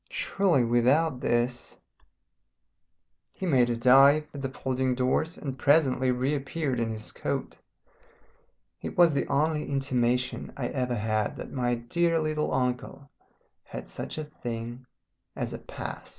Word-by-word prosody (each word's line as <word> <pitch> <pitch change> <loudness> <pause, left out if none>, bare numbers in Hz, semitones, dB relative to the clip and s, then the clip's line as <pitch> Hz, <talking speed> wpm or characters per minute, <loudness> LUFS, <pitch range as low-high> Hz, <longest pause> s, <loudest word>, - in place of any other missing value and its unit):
Surely 195 - +1
without 125 +5 +2
this 120 0 -1 0.9
" 85 +1 -53
He 190 - -2
made 130 -8 +3
a 120 - 0
dive 135 +5 +6
at 140 - -6
the 135 - -2
folding 130 -1 -1
doors 130 +6 0
and 135 -3 -6
presently 135 -3 +3
reappeared 135 +1 -1
in 115 -1 0
his 110 -1 -7
coat. - - -4 1.2
It - - -6
was 170 -3 +6
the 140 - 0
only 150 +1 0
intimation 125 -2 0
I 125 -3 -2
ever 125 -2 -1
had 110 -1 -1
that - - -7
my 120 -2 0
dear 165 +8 0
little 155 -1 -1
uncle 130 +2 -2 0.5
had - - -8
such - - -6
a 155 - -2
thing 120 -4 -6 0.5
as - - -3
a - - -5
Past. - - -7
130 Hz, 140 wpm, -28 LUFS, 120-145 Hz, 1.2 s, dive